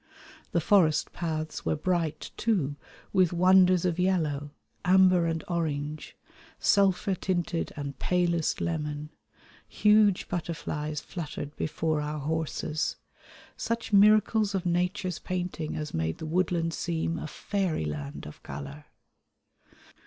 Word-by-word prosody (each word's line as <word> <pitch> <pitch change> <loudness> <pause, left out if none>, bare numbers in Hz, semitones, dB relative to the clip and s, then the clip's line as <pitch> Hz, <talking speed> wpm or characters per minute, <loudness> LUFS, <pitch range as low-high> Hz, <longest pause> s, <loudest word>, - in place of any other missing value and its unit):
The 170 - +2
forest 160 -4 +3
paths 155 -2 -3
were - - 0
bright, 165 -1 -1
too, 175 -11 0 0.4
with 185 -3 +4
wonders 185 0 +5
of 175 -1 0
yellow; 155 -6 0 0.3
amber 185 -2 +5
and 165 -1 -2
orange, 155 -3 -3 0.4
sulphur 195 -1 +3
tinted 175 -2 -1
and 140 -2 -6
palest 175 -3 +1
lemon, 150 -2 -3 0.6
huge 210 -2 +4
butterflies 155 -3 -3
fluttered 150 -3 -6
before 155 0 -1
our 150 +1 -3
horses, 155 +1 -2 0.6
such 230 -1 -3
miracles 210 0 +5
of 190 -1 -2
Nature's 180 +1 0
painting 175 -4 -3
as 150 -1 -4
made 80 0 -1
the - - -6
woodland 165 0 0
seem 165 0 -2
a - - -5
fairyland 80 - -3
of 75 - -11
colour. 70 +1 -8
165 Hz, 115 wpm, -28 LUFS, 150-185 Hz, 0.6 s, wonders